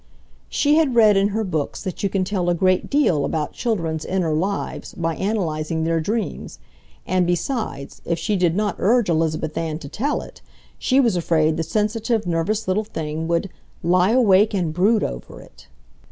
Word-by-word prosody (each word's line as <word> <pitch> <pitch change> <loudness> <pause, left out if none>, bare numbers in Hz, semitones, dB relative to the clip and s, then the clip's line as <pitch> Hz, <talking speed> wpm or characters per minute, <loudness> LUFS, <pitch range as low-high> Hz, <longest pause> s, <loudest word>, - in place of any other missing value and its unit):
She 295 +1 +2
had 295 -6 +2
read 215 -3 +6
in 195 +1 +3
her 215 +2 -1
books 160 -7 -3
that 185 - -5
you 200 - +1
can 190 -1 0
tell 185 -2 -1
a 175 - +2
great 185 +1 +1
deal 260 - +2
about 150 -1 -2
children's 165 -9 -2
inner 180 -4 -1
lives 190 +6 -3
by 165 -1 -2
analyzing 165 -6 -1
their 165 0 +1
dreams, 195 - -3 0.5
and 185 -1 +1
besides, 175 - -3
if 170 - -1
she 205 +6 -1
did 175 -3 +2
not 205 -1 -1
urge 230 +1 +3
Elizabeth 160 -1 0
Ann 160 -2 -2
to 160 - -9
tell 270 - -2
it, - - -14 0.4
she 265 +1 +2
was 235 -7 +3
afraid 160 -2 +2
the 165 - -1
sensitive, 215 +4 -1
nervous 185 +6 -1
little 190 +3 +1
thing 160 -6 -4
would 170 +2 -1 0.3
"lie 180 +2 +3
awake 215 -3 +4
and 170 -5 -1
brood 205 +6 +3
over - - -6
it." - - -17
185 Hz, 180 wpm, -22 LUFS, 165-215 Hz, 0.5 s, read